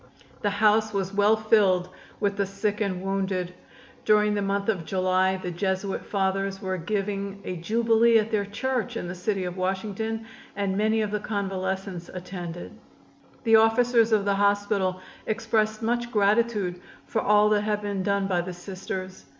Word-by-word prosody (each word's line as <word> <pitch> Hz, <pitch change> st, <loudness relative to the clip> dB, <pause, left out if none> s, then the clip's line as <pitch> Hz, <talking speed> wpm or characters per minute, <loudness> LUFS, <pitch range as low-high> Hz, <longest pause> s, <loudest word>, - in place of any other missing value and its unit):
The 205 Hz, -, +1 dB
house 215 Hz, +1 st, +2 dB
was 195 Hz, 0 st, -1 dB
well 205 Hz, +2 st, +4 dB
filled 205 Hz, -5 st, +3 dB, 0.3 s
with 200 Hz, -1 st, 0 dB
the 200 Hz, 0 st, 0 dB
sick 205 Hz, +2 st, -2 dB
and 190 Hz, -3 st, -1 dB
wounded. 190 Hz, -2 st, -1 dB, 0.5 s
During 210 Hz, 0 st, +4 dB
the 205 Hz, -, 0 dB
month 200 Hz, 0 st, -1 dB
of 195 Hz, -7 st, 0 dB
July 185 Hz, +2 st, +1 dB
the 180 Hz, -1 st, -5 dB
Jesuit 190 Hz, +2 st, -2 dB
Fathers 195 Hz, 0 st, -1 dB
were 190 Hz, -1 st, -2 dB
giving 200 Hz, +1 st, -3 dB
a 180 Hz, -, -4 dB
jubilee 230 Hz, +5 st, +3 dB
at 220 Hz, +1 st, 0 dB
their 205 Hz, -2 st, +1 dB
church 245 Hz, +3 st, -2 dB
in 175 Hz, -, -4 dB
the 175 Hz, -, -4 dB
city 190 Hz, +1 st, -2 dB
of 180 Hz, 0 st, -5 dB
Washington 210 Hz, +4 st, -2 dB, 0.3 s
and 200 Hz, -1 st, -1 dB
many 220 Hz, +2 st, +2 dB
of 210 Hz, -1 st, -2 dB
the 210 Hz, -, -1 dB
convalescents 190 Hz, -3 st, -3 dB
attended. 175 Hz, -2 st, -7 dB, 0.7 s
The 225 Hz, -2 st, +6 dB
officers 230 Hz, +1 st, +4 dB
of 210 Hz, -2 st, +3 dB
the 200 Hz, -, +2 dB
hospital 200 Hz, -2 st, +1 dB, 0.3 s
expressed 220 Hz, 0 st, 0 dB
much 240 Hz, +1 st, 0 dB
gratitude 205 Hz, -4 st, +1 dB, 0.2 s
for 220 Hz, -, -1 dB
all 210 Hz, 0 st, +4 dB
that 210 Hz, -1 st, +3 dB
had 210 Hz, 0 st, -1 dB
been 200 Hz, -2 st, -2 dB
done 200 Hz, +1 st, +1 dB
by 180 Hz, -3 st, +1 dB
the 180 Hz, +1 st, -6 dB
Sisters. 185 Hz, +1 st, -7 dB
200 Hz, 165 wpm, -26 LUFS, 190-215 Hz, 0.7 s, The